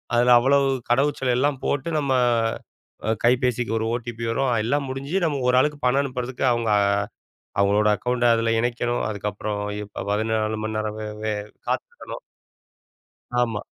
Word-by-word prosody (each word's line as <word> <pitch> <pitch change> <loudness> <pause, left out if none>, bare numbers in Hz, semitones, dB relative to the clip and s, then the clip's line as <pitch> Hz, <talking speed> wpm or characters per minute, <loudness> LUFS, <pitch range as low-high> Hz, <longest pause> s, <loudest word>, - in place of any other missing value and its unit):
அதுல 120 +1 +5
அவ்வளவு 140 +2 +3 0.2
கடவுச்சொல் 135 0 +2
எல்லாம் 140 0 +1
போட்டு 145 +4 -1
நம்ம 140 -2 -1 1.1
கைபேசிக்கு 120 -1 +2
ஒரு 110 - -1
ஓடிபி 120 -1 -4
வரும், 135 +1 +1
எல்லாம் 140 +3 0
முடிஞ்சி 140 +6 -4
நம்ம 145 -4 0
ஒரு 125 - +4
ஆளுக்கு 150 0 0
பணம் 135 +3 +3
அனுப்புறதுக்கு 130 -1 -3
அவங்க 115 -2 0 0.9
அவங்களோட 105 +1 +3
அக்கவுண்ட 125 +1 -1
அதுல 115 0 +1
இணைக்கணும். 120 0 -1
அதுக்கப்புறம் 105 0 -3 0.5
14 110 0 0
மணி 110 0 -3
நேரம் 110 0 -3
வே 105 - -4 0.2
வே 110 -1 0 0.3
காத்திருக்கணும். - - -4 1.2
ஆமா. 110 -3 -1
120 Hz, 130 wpm, -23 LUFS, 110-135 Hz, 1.2 s, அதுல